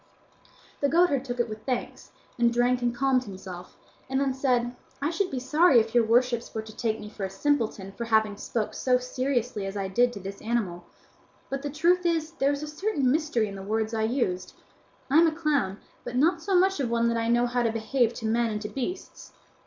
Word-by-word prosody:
The 285 - +2
goatherd 330 -5 +3
took 245 -2 -5
it 240 - +2
with 215 -1 -8
thanks, 250 -2 -4 0.3
and 235 0 +4
drank 245 +1 +2
and 240 0 0
calmed 260 0 +2
himself, 185 -3 -9 0.3
and 265 0 +1
then 275 -1 +1
said, 250 -2 0 0.2
"I 290 +3 0
should 370 +2 0
be 265 - -3
sorry 295 +1 +5
if 225 0 -1
your 240 -1 +5
worships 235 +1 +1
were 220 - -2
to 220 -1 -12
take 220 -1 -1
me 210 - -8
for 210 -1 -8
a 190 - -1
simpleton 215 -3 -1
for 235 +4 -5
having 220 -2 +2
spoken 215 +1 -3
so 250 -1 +2
seriously 250 -3 -2
as 195 +1 -5
I 195 -1 -2
did 240 +6 +3
to 205 - -7
this 195 +1 -8
animal; 205 -7 -2 0.7
but 275 0 -2
the 290 - -3
truth 345 +5 +2
is 330 -2 0
there 285 -4 +1
is 285 +1 -3
a - - -4
certain 300 -4 0
mystery 295 -7 +1
in 200 - -7
the 195 - -7
words 220 +2 -1
I 220 - 0
used. 220 -6 -1 0.6
I 300 - +7
am 335 - +6
a - - +2
clown, 295 - 0 0.3
but 245 - -6
not 330 +6 +3
so 390 +3 0
much 380 0 +3
of 260 -4 0
one 235 0 +1
but 235 - +2
that 230 - 0
I 230 - -1
know 240 +1 +3
how 245 0 0
to 230 -1 +1
behave 225 +2 +1
to 225 - -6
men 230 +1 +1
and 210 -1 -3
to 210 - -4
beasts." 315 +8 -6
245 Hz, 230 wpm, -27 LUFS, 220-280 Hz, 0.7 s, I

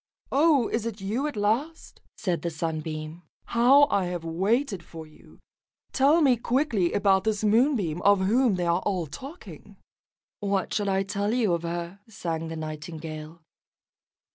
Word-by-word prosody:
"Oh, 285 -4 +4
is 230 0 -2
it 220 -2 -6
you 220 +9 -2
at 295 - -5
last?" 230 +11 -2 0.2
said 180 -5 -1
the 170 - -2
Sunbeam. 155 0 -5 0.2
"How 255 +5 +5
I 195 -2 +2
have 175 -2 -4
waited 195 - 0
for 160 -1 -10
you. 155 - -19 0.6
Tell 290 +5 +4
me 265 -5 +4
quickly 235 - 0
about 195 -2 +3
this 215 0 -1
Moonbeam 215 - +2
of 200 0 +4
whom 225 +3 +3
they 180 -1 -1
are 170 +2 +1
all 185 -5 -1
talking." 275 - -11 0.6
"What 200 -2 -1
shall 205 -2 0
I 195 0 +1
tell 205 +1 -2
you 220 -8 +2
of 170 - -1
her?" 170 +2 -5
sang 165 -6 -4
the 165 - -5
Nightingale. 155 +1 -7
195 Hz, 155 wpm, -26 LUFS, 170-235 Hz, 0.6 s, How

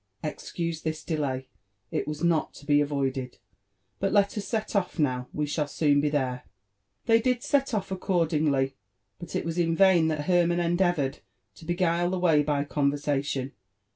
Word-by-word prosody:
Excuse 165 +1 -4
this 155 0 -3
delay*^it 130 - -4
was 150 +2 -4
not 170 -2 +1
to - - -13
be 145 0 +4
avoided: 135 -4 -2 0.6
but 195 - 0
let 200 -1 +3
us 210 - -3
set 220 -2 -2
off 195 -2 0
now— 130 -5 0
we 150 - -1
shall 150 0 -1
soon 145 -1 +2
be 150 - +1
there.'' 130 -4 -1 0.6
They 230 -1 +4
did 250 0 0
set 275 -1 +1
off 195 -2 -3
accordingly, 155 -7 +1 0.5
but 175 - -8
it - - -1
was 165 +1 -2
in 165 -1 +2
vain 185 -3 +5
that 155 -2 -1
Hermann 175 -1 +3
en 170 0 +1
deavoured 175 -7 +1 0.3
to 165 - -14
beguile 175 0 +1
the 185 - -1
way 165 -4 +4
by 145 -1 0
conversation. 140 -2 -1
155 Hz, 170 wpm, -27 LUFS, 145-175 Hz, 0.6 s, vain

